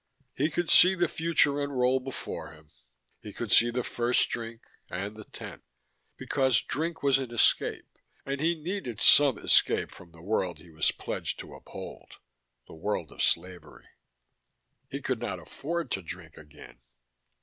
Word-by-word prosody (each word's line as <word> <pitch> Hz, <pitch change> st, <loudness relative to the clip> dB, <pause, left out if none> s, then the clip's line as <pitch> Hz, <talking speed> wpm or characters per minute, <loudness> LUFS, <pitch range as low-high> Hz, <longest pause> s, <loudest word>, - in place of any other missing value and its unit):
He 150 Hz, +4 st, 0 dB
could 175 Hz, +1 st, -1 dB
see 185 Hz, +2 st, +8 dB
the 175 Hz, -1 st, +1 dB
future 155 Hz, -3 st, +2 dB
unroll 130 Hz, -2 st, +1 dB
before 130 Hz, -10 st, -7 dB
him. 75 Hz, 0 st, -19 dB, 0.5 s
He 105 Hz, -, -9 dB
could 115 Hz, +1 st, -6 dB
see 120 Hz, -, +6 dB
the 125 Hz, +1 st, -2 dB
first 120 Hz, +1 st, +1 dB
drink, 115 Hz, 0 st, -6 dB, 0.3 s
and 100 Hz, +4 st, -4 dB
the 110 Hz, -1 st, -11 dB
tenth. -, -, -10 dB, 0.6 s
Because 130 Hz, -4 st, +2 dB
drink 160 Hz, +2 st, -3 dB
was 135 Hz, -1 st, +4 dB
an 130 Hz, -3 st, -4 dB
escape, 120 Hz, -, +2 dB, 0.4 s
and 140 Hz, +1 st, -3 dB
he 170 Hz, +2 st, +2 dB
needed 160 Hz, -, -5 dB
some 145 Hz, -3 st, +7 dB
escape -, -, +3 dB
from 85 Hz, -1 st, -14 dB
the 85 Hz, 0 st, -16 dB
world 95 Hz, -3 st, -1 dB
he 85 Hz, -, -16 dB
was 80 Hz, -1 st, +1 dB
pledged -, -, -4 dB
to -, -, -12 dB
uphold, -, -, -10 dB, 0.5 s
the -, -, -14 dB
world 85 Hz, -1 st, -3 dB
of -, -, -7 dB
slavery. 90 Hz, +1 st, -2 dB, 1.0 s
He 140 Hz, 0 st, -6 dB
could 130 Hz, -3 st, -1 dB
not 105 Hz, -6 st, -3 dB
afford 155 Hz, -, -5 dB
to 95 Hz, -, -1 dB
drink 85 Hz, -2 st, -9 dB
again. 75 Hz, -5 st, -14 dB
120 Hz, 160 wpm, -28 LUFS, 95-145 Hz, 1.0 s, see